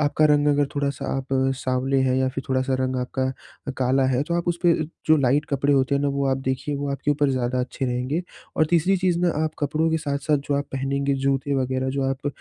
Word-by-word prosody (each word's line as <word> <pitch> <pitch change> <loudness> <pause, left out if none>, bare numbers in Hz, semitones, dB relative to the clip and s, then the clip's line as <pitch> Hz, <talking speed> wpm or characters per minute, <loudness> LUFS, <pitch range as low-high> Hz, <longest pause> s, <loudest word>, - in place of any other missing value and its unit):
आपका 150 +1 +2
रंग 150 -1 +3
अगर 145 0 +3
थोड़ा-सा 140 -1 -2
आप 135 -1 -4 0.3
साँवले 130 +1 0
हैं 130 -1 +2
या 130 0 +2
फिर 135 +1 -5
थोड़ा-सा 130 0 +1
रंग 130 0 -1
आपका 130 +1 -3 0.5
अ, - - +1
काला 130 +1 +2
है, 130 +1 +1
तो 170 +3 -3
आप 175 0 -1
उसपे 175 0 +2 0.3
जो 155 - +6
लाइट 140 +1 +2
कपड़े 140 +1 +2
होते 135 0 +2
हैं 140 - +1
ना, 145 - +2
वो 140 0 -1
आप 130 -1 +1
देखिए 130 +3 -1
वो 140 0 -3
आपके 140 +1 -1
ऊपर 145 0 +2
ज़्यादा 125 -1 0
अच्छे 130 +1 -3
रहेंगे। 130 +7 -1 0.3
और 155 - +3
तीसरी 175 +3 +3
चीज़ 180 -2 +1
ना 180 - +3
आप 155 - 0
कपड़ों 155 +2 0
के 160 - +2
साथ-साथ 145 -1 0
जो 145 - +2
आप 140 0 0
पहनेंगे 140 +1 -1
जूते 135 +1 0
वगैरह, 130 0 -1
जो 135 +1 -1
आप 135 +1 -2
140 Hz, 230 wpm, -23 LUFS, 130-145 Hz, 0.5 s, जो